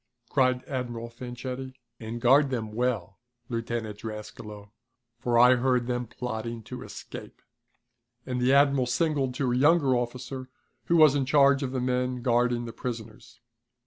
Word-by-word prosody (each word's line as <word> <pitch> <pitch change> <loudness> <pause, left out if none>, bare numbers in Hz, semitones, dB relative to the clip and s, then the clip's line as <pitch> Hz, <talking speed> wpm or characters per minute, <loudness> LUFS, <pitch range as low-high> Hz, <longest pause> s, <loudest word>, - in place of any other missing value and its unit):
cried 130 -2 +2
Admiral 120 -3 -4
Fanchetti. 125 +2 -6 0.2
"And 115 +1 -6
guard 135 +4 +5
them 115 -5 -3
well, 110 -5 -2 0.3
Lieutenant 115 -3 -3
Drascalo, 105 -1 -8 0.5
for 120 0 +1
I 125 +1 +7
heard 125 -1 +1
them 120 0 -2
plotting 115 -1 -5
to - - -8
escape," - - -9 0.9
and 125 -1 -2
the 125 +1 +3
admiral 140 -2 +4
signaled 135 -1 0
to 130 -2 0
a - - +1
younger 145 0 +4
officer, 125 +2 -4 0.4
who 170 - +3
was 155 -4 +7
in 140 -2 0
charge 140 -1 +5
of 135 -2 -2
the 130 - -2
men 125 0 -1
guarding 120 -1 +2
the 115 - -7
prisoners. 115 0 -7
125 Hz, 145 wpm, -27 LUFS, 120-130 Hz, 0.9 s, I